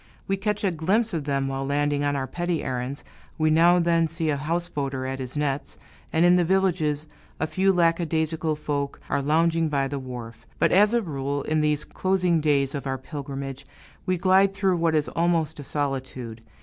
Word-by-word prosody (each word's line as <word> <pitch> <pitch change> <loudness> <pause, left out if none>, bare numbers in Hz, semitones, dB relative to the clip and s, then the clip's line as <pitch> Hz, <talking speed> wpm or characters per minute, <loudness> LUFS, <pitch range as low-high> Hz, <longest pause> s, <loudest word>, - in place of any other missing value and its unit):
We 195 - +1
catch 210 +1 -2
a 195 - +2
glimpse 190 +8 0
of 155 -4 -2
them 140 -1 0
when 135 0 -3
landing 145 0 +1
on 145 0 +1
our 135 -1 -1
petty 175 +4 -2
errands, 130 +2 -4 0.3
we 155 0 +2
now 170 +3 +6
and 175 -1 +2
then 165 -1 +3
see 165 -1 -1
a - - +1
houseboater 145 -4 -2
at 135 0 -4
his 130 +2 -5
nets, 145 -1 -2 0.3
and 160 +2 +3
in 175 +1 +6
the 175 - +3
villages 165 -5 +1 0.3
a - - +1
few 190 +4 +2
lackadaisical 165 -2 +1
folk 145 -2 -3
are 140 - +1
lounging 165 +2 +2
by 140 -2 0
the 140 0 -4
wharf; 120 -3 -8
but - - +2
as 210 +4 +5
a 235 - +2
rule, 140 -3 -3
in 155 0 0
these 150 -1 +1
closing 180 -3 +1
days 140 -3 +2
of 140 -2 -4
our 130 0 -1
pilgrimage, 135 -1 -6 0.4
we 185 0 +1
glide 190 +2 +4
through 195 -3 +1
what 165 -1 +1
is 150 -1 +1
almost 165 -3 0
a - - -6
solitude. 130 -5 -4
155 Hz, 195 wpm, -25 LUFS, 140-175 Hz, 0.4 s, now